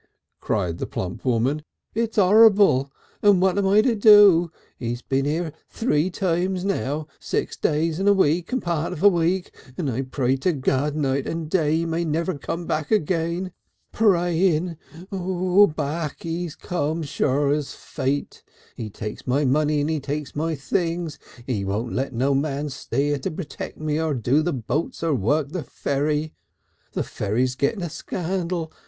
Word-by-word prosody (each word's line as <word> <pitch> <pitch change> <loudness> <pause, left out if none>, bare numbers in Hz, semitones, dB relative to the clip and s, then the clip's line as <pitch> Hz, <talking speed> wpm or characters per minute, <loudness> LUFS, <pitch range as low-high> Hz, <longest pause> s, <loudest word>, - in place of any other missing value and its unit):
cried 90 -6 -1
the - - -3
plump 90 -1 -5
woman; 130 +4 +1 0.3
"it's 225 0 -2
'orrible! 200 - +5 0.3
And 205 -3 +5
what 185 0 +3
am 195 - +1
I 205 +2 +5
to 250 - +3
do? 205 -5 +7 0.3
He's 120 0 -4
been 135 0 0
here 155 +1 -1 0.2
three 185 -7 +1
times 185 0 -1
now, 150 - -1
six - - -2
days 160 +2 0
and 195 +1 +3
a - - +7
week 170 0 +2
and 255 -1 -1
a - - -19
part 170 -2 -1
of 155 - -6
a - - +9
week, 175 0 +1 0.2
and 150 -7 -1
I 125 +3 -1
pray 130 0 0
to 170 +7 +1
God 140 +1 0
night 140 -2 0
and 165 -1 -3
day 155 -2 +2
he 165 +1 0
may 165 +1 -1
never 165 +3 -1
come 170 +4 -4
again. 170 +1 0 0.4
Praying! 175 -4 +2 0.4
Back 180 -5 +1
he's 165 -1 -3
come 160 -1 -2
sure 140 0 +1
as 145 -1 -2
fate. 140 +2 -3 0.3
He 110 - -5
takes 105 +3 -7
my 140 +4 +2
money 150 +2 +2
and 145 - -1
he 155 - 0
takes 145 +1 -5
my 160 +2 -1
things. 165 +2 -2 0.3
He 115 -7 -2
won't 105 +5 -2
let 135 +2 -1
no 130 +3 +1
man 145 +1 -1
stay 140 +1 -2
here 145 -1 0
to - - -3
protect 155 0 -7
me 155 0 -1
or 160 -3 0
do 125 +5 +2
the 175 +3 0
boats 135 +6 -3
or 165 -2 +2
work 140 +5 +1
the 180 +2 -4
ferry. 150 +3 -2 0.6
The - - -1
ferry's 120 +5 -1
getting 140 - -1
a 170 - -3
scandal. 175 -1 -3
155 Hz, 170 wpm, -23 LUFS, 140-180 Hz, 0.6 s, a